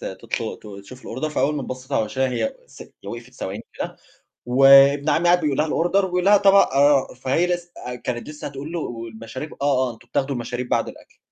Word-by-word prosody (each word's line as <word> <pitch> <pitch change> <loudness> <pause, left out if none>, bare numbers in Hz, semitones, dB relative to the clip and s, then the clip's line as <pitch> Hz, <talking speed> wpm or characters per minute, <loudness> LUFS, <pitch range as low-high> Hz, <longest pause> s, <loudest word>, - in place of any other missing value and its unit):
تطل - - -5
ت - - -13 0.2
تشوف 130 +5 -13
الorder 130 +6 -3
فأول 150 0 0
ما 140 - -3
بصّيت 130 +1 -8
على 110 - +2
وِشّها 130 +4 -1
هي 115 -3 -2
ث - - -12
هي - - -14
وقْفِت 120 +2 -9
ثواني 100 +1 -6
كده، - - -5 0.5
وابن 135 +3 +6
عمّي 170 - +1
قاعد 175 +1 +5
بيقول 145 -4 -1
لها 155 - +2
الorder 175 +5 0
وبيقول 180 -1 -1
لها 205 +1 +6
"طَبق 195 -7 +4
آآ" 140 -1 +3
فهي 140 +7 +1
لسّ 175 -1 -3 0.2
آآ 125 - -4
كانت 125 +1 -5
لسّه 150 0 -8
هتقول 140 +3 -8
له 175 - -2
والمشاريب 115 +3 -7
"آه، 130 -3 +2
آه، - - -5
أنتم 120 +2 -21
بتاخدوا 135 +2 -1
المشاريب 120 +1 -4
بعد - - 0
الأكل" - - -14
135 Hz, 210 wpm, -22 LUFS, 125-155 Hz, 0.5 s, وابن